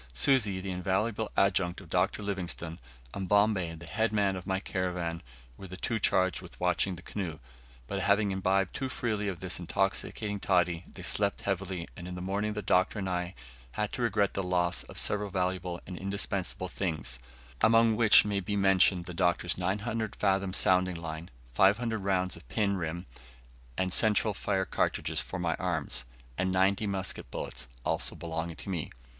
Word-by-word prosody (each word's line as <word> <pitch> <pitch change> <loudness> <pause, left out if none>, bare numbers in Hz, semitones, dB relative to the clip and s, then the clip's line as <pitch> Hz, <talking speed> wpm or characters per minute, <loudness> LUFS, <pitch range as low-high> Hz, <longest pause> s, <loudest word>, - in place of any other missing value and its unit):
Susi, 105 - +4
the 95 0 -4
invaluable 100 +4 -1
adjunct 95 -3 +2
of - - -12
Dr. 105 - +1
Livingstone, 90 -4 -4 0.3
and 95 -2 -4
Bombay, 100 -5 +3
the 85 +1 -10
headman 105 -3 +1
of 90 +1 -7
my 95 -1 +1
caravan, 90 -4 -2 0.4
were 95 - -9
the 90 0 -8
two 110 +4 -1
charged 95 -2 +2
with - - -13
watching 90 +1 +1
the 90 - -12
canoe; 90 -7 -4 0.5
but, 95 +9 -3
having 100 +1 +3
imbibed 95 0 +1
too 135 -1 -3
freely 110 -5 -1
of 90 -4 -4
this 95 -1 -2
intoxicating 100 +3 -1
toddy, 90 -3 +2
they 95 - -10
slept 100 +2 +1
heavily, 95 -3 -2
and 90 -1 -8
in 90 - -5
the - - -5
morning 100 +3 -1
the 105 0 -4
Doctor 95 +4 +2
and 95 -2 -2
I 90 0 -2 0.4
had 105 -1 -1
to - - -3
regret 105 -4 +2
the 100 - -1
loss 90 -1 +1
of - - -11
several 105 0 +1
valuable 90 -2 -1
and 90 -2 -7
indispensable 100 -2 -1
things; 80 -9 -3 0.4
among 115 0 +5
which 110 -2 +7
may 100 -1 0
be 100 +2 -3
mentioned 95 -2 +4
the 90 - -6
Doctor's 85 -1 +1
900 105 +4 -2
fathom 95 -1 +1
sounding 90 -1 +3
line, 80 0 -6 0.2
500 110 - +3
rounds 95 -2 0
of 85 - -14
pin, 100 -3 +1
rim, 85 0 -3 0.7
and 95 -1 0
central 110 -1 +4
fire 95 -1 0
cartridges - - 0
for 95 - -5
my 85 -2 0
arms, 80 -8 -1 0.3
and 95 +1 +1
ninety 95 +3 +3
musket 95 -10 -3
bullets, - - -5 0.2
also - - 0
belonging 80 0 -4
to - - -9
me. 85 -5 -2
95 Hz, 175 wpm, -30 LUFS, 90-100 Hz, 0.7 s, which